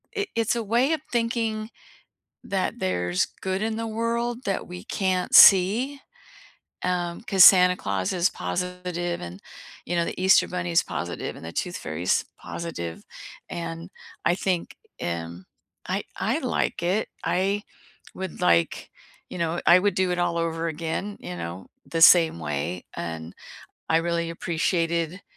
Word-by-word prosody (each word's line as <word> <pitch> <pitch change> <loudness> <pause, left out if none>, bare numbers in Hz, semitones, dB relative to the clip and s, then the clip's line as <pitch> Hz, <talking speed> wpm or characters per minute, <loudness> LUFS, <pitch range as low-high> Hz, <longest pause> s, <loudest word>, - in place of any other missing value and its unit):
It 405 -3 -2
it's 230 0 +1
a 235 - -2
way 240 +8 +2
of 315 - -2
thinking 230 -2 -1 0.7
that 190 -2 -2
there's 90 -1 0 0.2
good 190 +1 -2
in 220 0 -1
the 230 0 -3
world 235 +2 -2
that 195 - -2
we 180 0 -8
can't 185 -2 -1
see, 225 +9 +7 0.8
um, 175 -1 -2
'cause 195 -5 +5
Santa 180 -1 +7
Claus 95 -2 -2
is 180 0 +2
positive 180 -1 -3
and, 90 +2 -8 0.4
you 175 - -2
know, 170 - +2
the - - -5
Easter 190 +1 +5
bunny's 175 -2 0
positive, 85 - -5
and - - -10
the 80 - -7
Tooth 180 0 -3
Fairy's 80 +3 -1
positive, 85 - -6 0.4
and 165 +1 -6 0.4
I 175 - +3
think, 180 -2 -2 0.3
um, 85 +1 -4 0.4
I - - -1
I - - 0
I - - -3
like - - -1
it. 190 +5 0
I 195 +3 0 0.5
would, 190 -3 -6
like, 85 0 +2 0.4
you - - -7
know 170 0 -1
I 180 - +7
would 205 +2 +1
do 185 -1 +1
it 175 - -1
all 175 -1 0
over 165 0 -1
again, 165 +5 -4
you 90 0 -7
know, 85 +2 -7 0.2
the 165 - -3
same 165 - +7
way, 80 +4 -3
and 80 0 -6 0.6
I 160 - +4
really 170 0 -1
appreciated, 170 +1 -1
175 Hz, 150 wpm, -25 LUFS, 160-195 Hz, 0.8 s, see